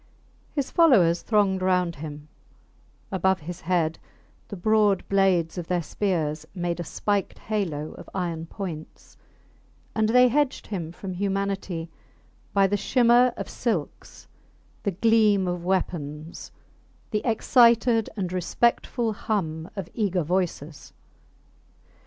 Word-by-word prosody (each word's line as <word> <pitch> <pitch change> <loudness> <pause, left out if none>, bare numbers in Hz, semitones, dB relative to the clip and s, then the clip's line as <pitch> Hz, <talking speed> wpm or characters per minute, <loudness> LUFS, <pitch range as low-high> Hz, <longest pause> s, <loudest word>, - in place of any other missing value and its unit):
His 280 -3 -1
followers 200 - +5
thronged 200 -4 +2
round 180 -3 +1
him; 150 0 -8 0.8
above 190 -1 +1
his 170 +3 -7
head 165 -2 0 0.5
the - - -7
broad 205 0 +2
blades 185 -3 +2
of 170 - -6
their 175 -2 0
spears 155 -5 -1
made 175 -1 -2
a - - -2
spiked 200 +4 -2
halo 170 -9 -3
of - - -12
iron 170 -3 -3
points, 165 -5 -8 0.8
and 220 -1 +1
they 250 +2 +6
hedged 290 +1 0
him 170 -6 -5
from 185 +2 -7
humanity 195 -3 -2 0.6
by 195 -1 +4
the 205 +1 +1
shimmer 245 +3 +4
of - - -5
silks, 205 - -4 0.5
the - - -1
gleam 205 0 +3
of 175 -1 -3
weapons, 165 -4 -3 0.6
the 210 - 0
excited 230 -1 +4
and 185 -3 -3
respectful 235 +4 0
hum 165 -7 -3
of 195 -4 -5
eager 195 -6 0
voices. 165 -3 -3
190 Hz, 120 wpm, -25 LUFS, 170-215 Hz, 0.8 s, they